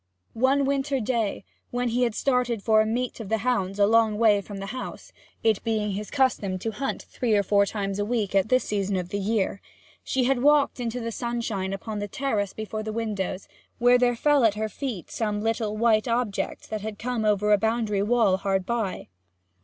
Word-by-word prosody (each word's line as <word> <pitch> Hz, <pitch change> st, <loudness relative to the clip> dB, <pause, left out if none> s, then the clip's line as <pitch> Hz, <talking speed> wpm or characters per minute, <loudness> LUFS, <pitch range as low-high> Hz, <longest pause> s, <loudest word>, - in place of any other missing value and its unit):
One 270 Hz, +4 st, +2 dB
winter 275 Hz, 0 st, 0 dB
day, 225 Hz, -4 st, -1 dB, 0.2 s
when 245 Hz, 0 st, -1 dB
he 240 Hz, +2 st, 0 dB
had 235 Hz, -3 st, +1 dB
started 250 Hz, -5 st, 0 dB
for 220 Hz, -1 st, +5 dB
a 215 Hz, -, 0 dB
meet 245 Hz, +3 st, -2 dB
of 215 Hz, -4 st, -7 dB
the 220 Hz, -, +2 dB
hounds 205 Hz, -4 st, -1 dB
a 200 Hz, -, +5 dB
long 220 Hz, 0 st, +3 dB
way 210 Hz, -3 st, +4 dB
from 200 Hz, 0 st, -9 dB
the 195 Hz, -, -5 dB
house 255 Hz, -, -7 dB, 0.3 s
it 220 Hz, -3 st, +2 dB
being 215 Hz, -2 st, 0 dB
his 205 Hz, +2 st, -4 dB
custom 250 Hz, -9 st, +1 dB
to 225 Hz, +4 st, -3 dB
hunt 270 Hz, +6 st, -3 dB
three 235 Hz, -4 st, -1 dB
or 200 Hz, -, +3 dB
four 200 Hz, +1 st, +3 dB
times 200 Hz, -1 st, -3 dB
a -, -, +1 dB
week 210 Hz, -3 st, -1 dB
at 195 Hz, +2 st, +2 dB
this 255 Hz, 0 st, +3 dB
season 200 Hz, -1 st, -1 dB
of 180 Hz, -1 st, -4 dB
the 200 Hz, -, -2 dB
year 200 Hz, -1 st, -1 dB, 0.4 s
she 265 Hz, -, 0 dB
had 250 Hz, 0 st, +1 dB
walked 290 Hz, -1 st, +4 dB
into 240 Hz, 0 st, -3 dB
the 230 Hz, -1 st, -4 dB
sunshine 230 Hz, -5 st, -3 dB
upon 210 Hz, +2 st, -4 dB
the 205 Hz, -, -3 dB
terrace 210 Hz, -5 st, -1 dB
before 215 Hz, 0 st, -5 dB
the 215 Hz, 0 st, -4 dB
windows, 210 Hz, -4 st, -3 dB, 0.3 s
where 245 Hz, +1 st, +5 dB
there 245 Hz, -1 st, +3 dB
fell 290 Hz, +2 st, +3 dB
at 215 Hz, -2 st, +4 dB
her 215 Hz, +1 st, -2 dB
feet 235 Hz, -, -5 dB
some 210 Hz, -2 st, -1 dB
little 220 Hz, -1 st, -1 dB
white 220 Hz, 0 st, +3 dB
object 235 Hz, -4 st, -2 dB
that 215 Hz, -1 st, -3 dB
had 215 Hz, 0 st, -5 dB
come 240 Hz, 0 st, -2 dB
over 210 Hz, 0 st, +3 dB
a 205 Hz, -, +4 dB
boundary 220 Hz, -2 st, 0 dB
wall 210 Hz, -3 st, +3 dB
hard 195 Hz, -1 st, -1 dB
by. 225 Hz, -4 st, -2 dB
220 Hz, 210 wpm, -25 LUFS, 205-245 Hz, 0.4 s, for